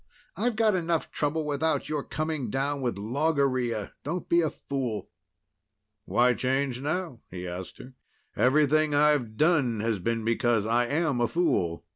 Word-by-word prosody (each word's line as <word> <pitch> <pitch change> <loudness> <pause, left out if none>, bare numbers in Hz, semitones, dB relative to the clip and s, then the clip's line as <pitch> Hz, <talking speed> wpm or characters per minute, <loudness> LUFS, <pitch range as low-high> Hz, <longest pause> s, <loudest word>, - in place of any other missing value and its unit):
I've 245 -2 0
got 220 -1 +3
enough 170 -3 -1
trouble 150 +1 -1
without 150 +2 0
your 150 -2 -2
coming 155 -6 -3
down 140 +3 -1
with 120 -6 -1
logorrhea. 130 -2 0
Don't 170 +5 -4
be 170 0 +4
a 160 - +1
fool." 130 -8 -4 0.9
"Why 125 +2 +3
change 130 0 -1
now?" 155 -2 -3
he 90 0 -6
asked 90 +1 -7
her. 130 - -12 0.4
"Everything 150 +3 +3
I've 145 -7 +2
done 145 -9 +2
has 110 -2 0
been 115 +4 -1
because 115 -1 +1
I 120 +2 +2
am 145 -3 0
a 120 - +3
fool. 90 - 0
135 Hz, 150 wpm, -27 LUFS, 115-155 Hz, 0.9 s, be